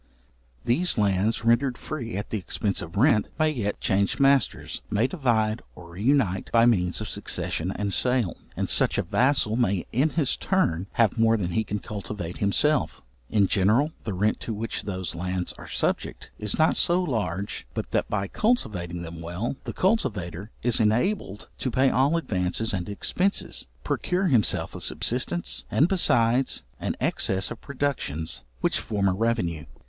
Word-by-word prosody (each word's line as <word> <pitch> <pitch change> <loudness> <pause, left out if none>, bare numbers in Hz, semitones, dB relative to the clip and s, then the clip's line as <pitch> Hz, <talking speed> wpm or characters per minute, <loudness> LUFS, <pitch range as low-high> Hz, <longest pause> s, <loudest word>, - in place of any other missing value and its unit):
These 150 +9 +1
lands, 105 +2 +1
rendered 120 +2 +3
free 120 -9 -5
at 100 - -5
the 110 - -1
expence 100 +2 -2
of 85 +4 -7
rent, 115 -2 +4
may 155 -1 +3
yet 105 -8 -2
change 100 +1 +1
masters, 140 0 +2
may 105 +2 +2
divide 120 -8 +1
or 85 -1 -12
reunite 105 0 +1
by 115 0 +5
means 90 -5 +2
of 110 - -4
succession 90 -4 -1
and 100 -1 -2
sale; 125 -8 +1 0.2
and - - 0
such - - +3
a - - +1
vassal 130 -4 +2
may 100 -7 +1
in 135 +7 +2
his 150 -4 +1
turn 95 - 0
have 115 -1 +2
more 115 0 +4
than 90 -4 -2
he 110 +6 +1
can 105 - -3
cultivate 100 -4 -6
himself. 145 +9 +1 0.3
In 105 -2 +3
general 110 +11 +3
the 105 - -3
rent 105 +4 +1
to 115 - -4
which 110 +2 -3
those 95 -3 -3
lands 90 +1 -3
are - - -10
subject, - - -2
is 105 -2 -2
not 160 0 +4
so 175 +2 +3
large, 100 - -3
but - - -4
that, - - 0
by 100 -1 -1
cultivating 95 - -1
them 85 0 -8
well, 90 +10 -3
the - - -3
cultivator 105 - -1
is 120 -1 +2
enabled 110 - 0
to 130 - -1
pay 130 +2 +3
all 140 +6 +3
advances, 105 - -1
and 90 0 -3
expences, 180 - -1 0.2
procure 185 0 0
himself 120 -7 +2
a - - -7
subsistence, 125 - 0
and 150 - +4
besides, 125 -9 +2 0.2
an - - -2
excess 95 0 0
of 120 - -7
productions 130 - -3 0.2
which - - +1
form 100 -2 -1
a 95 - +3
revenue. 95 -7 -1
110 Hz, 165 wpm, -26 LUFS, 95-130 Hz, 0.3 s, by